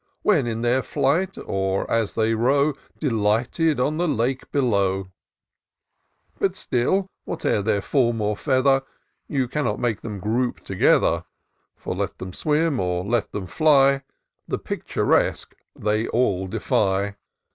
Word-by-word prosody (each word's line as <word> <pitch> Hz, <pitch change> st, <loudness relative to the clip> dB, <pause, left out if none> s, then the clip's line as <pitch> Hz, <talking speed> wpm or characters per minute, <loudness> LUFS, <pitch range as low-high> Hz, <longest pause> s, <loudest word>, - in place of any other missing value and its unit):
When 160 Hz, -, +3 dB
in 115 Hz, -1 st, -2 dB
their 125 Hz, +2 st, +2 dB
flight, 170 Hz, +10 st, 0 dB
or 95 Hz, 0 st, -1 dB
as 115 Hz, -3 st, 0 dB
they 110 Hz, 0 st, +2 dB
row 140 Hz, +6 st, +2 dB, 0.2 s
Delighted 125 Hz, +5 st, +1 dB
on 150 Hz, +5 st, +1 dB
the 175 Hz, +1 st, +1 dB
lake 130 Hz, -1 st, -1 dB
below! 100 Hz, -8 st, +1 dB, 1.3 s
But -, -, +1 dB
still, 185 Hz, +11 st, 0 dB, 0.2 s
whate'er 105 Hz, -, -1 dB
their 100 Hz, -1 st, 0 dB
form 120 Hz, -5 st, +1 dB
or 105 Hz, 0 st, 0 dB
feather, 135 Hz, +1 st, +2 dB, 0.5 s
You 135 Hz, -3 st, 0 dB
cannot 130 Hz, -5 st, -1 dB
make 115 Hz, -4 st, -1 dB
them 105 Hz, -3 st, -5 dB
group 120 Hz, +6 st, -1 dB
together; -, -, +2 dB, 0.5 s
For -, -, -5 dB
let -, -, -3 dB
them 95 Hz, -1 st, -7 dB
swim 150 Hz, -, +1 dB
or 90 Hz, -1 st, -1 dB
let 115 Hz, +1 st, 0 dB
them 100 Hz, -, -4 dB
fly. 140 Hz, -, +4 dB, 0.5 s
The -, -, -1 dB
Picturesque -, -, 0 dB, 0.2 s
they 110 Hz, +2 st, 0 dB
all 100 Hz, -6 st, +1 dB
defy. 100 Hz, +2 st, 0 dB
120 Hz, 135 wpm, -23 LUFS, 105-140 Hz, 1.3 s, fly